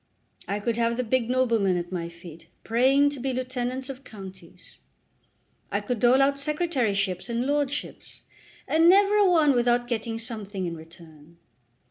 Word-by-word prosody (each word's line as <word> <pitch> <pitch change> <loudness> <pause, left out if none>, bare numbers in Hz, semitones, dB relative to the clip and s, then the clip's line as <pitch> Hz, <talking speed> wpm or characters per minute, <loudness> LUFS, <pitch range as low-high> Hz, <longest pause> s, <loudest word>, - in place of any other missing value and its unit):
I 200 +1 -2
could 230 +2 -2
have 235 0 0
the 250 - 0
big 245 0 0
noblemen 230 -7 +2
at 175 0 -5
my 170 -2 -4
feet, 170 -1 -13 0.2
praying 270 +5 +3
to 285 - -7
be 265 +1 -2
Lieutenants 255 0 -3
of 270 -1 -8
Counties. 195 -5 -12 0.9
I - - 0
could 245 -4 -3
dole 250 +4 +5
out 280 0 +1
secretaryships 245 - -1
and 235 +1 -1
lordships, 285 0 -3 0.4
and 325 +2 +4
never 400 +2 +5
a 405 -2 +5
one 315 -5 +4
without 240 0 +2
getting 230 -1 -3
something 215 -5 -5
in 170 -1 -4
return. 160 -1 -15
240 Hz, 155 wpm, -25 LUFS, 195-270 Hz, 0.9 s, dole